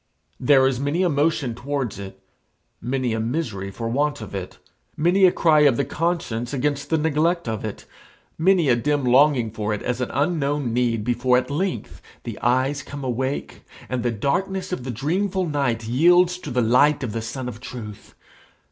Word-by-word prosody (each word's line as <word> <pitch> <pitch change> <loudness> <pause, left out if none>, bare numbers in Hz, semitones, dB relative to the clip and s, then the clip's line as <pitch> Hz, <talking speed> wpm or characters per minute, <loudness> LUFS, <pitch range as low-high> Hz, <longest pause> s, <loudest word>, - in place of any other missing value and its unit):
There 135 +1 +5
is 130 -2 +1
many 145 +6 0
a 180 - +2
motion 145 -4 +1
towards 120 -3 -3
it, 95 -1 -9 0.6
many 125 -1 -1
a 110 - -1
misery 110 -5 -3
for 115 +4 -5
want 145 +5 0
of 110 -3 -9
it, 95 -2 -6 0.4
many 180 +5 +4
a 180 - +6
cry 160 -3 +3
of 145 -5 +4
the 140 - +1
conscience 145 -6 -2
against 145 +1 -1
the 160 - +2
neglect 160 +1 +1
of 110 -1 -3
it, 110 -2 -6 0.5
many 175 -1 +3
a 125 - +5
dim 145 +4 0
longing 125 -2 +4
for 105 -1 -2
it 105 - -8
as 125 0 -2
an 125 - -2
unknown 145 -4 0
need 120 -3 +1
before 125 +2 +2
at 125 +2 -2
length 180 +6 -3 0.2
the - - -6
eyes 130 +4 +1
come 140 0 -8
awake, 130 +2 -3 0.3
and 125 -1 -1
the 120 - 0
darkness 185 - -2
of 130 -9 -4
the - - -5
dreamful 180 - -1
night 120 -7 -1
yields 175 +8 +4
to 150 - -7
the 125 -1 +1
light 140 +5 +3
of 120 - -3
the 115 +1 -3
sun 125 +3 -5
of 120 -2 -7
truth. 110 -5 -9
135 Hz, 185 wpm, -23 LUFS, 120-150 Hz, 0.6 s, a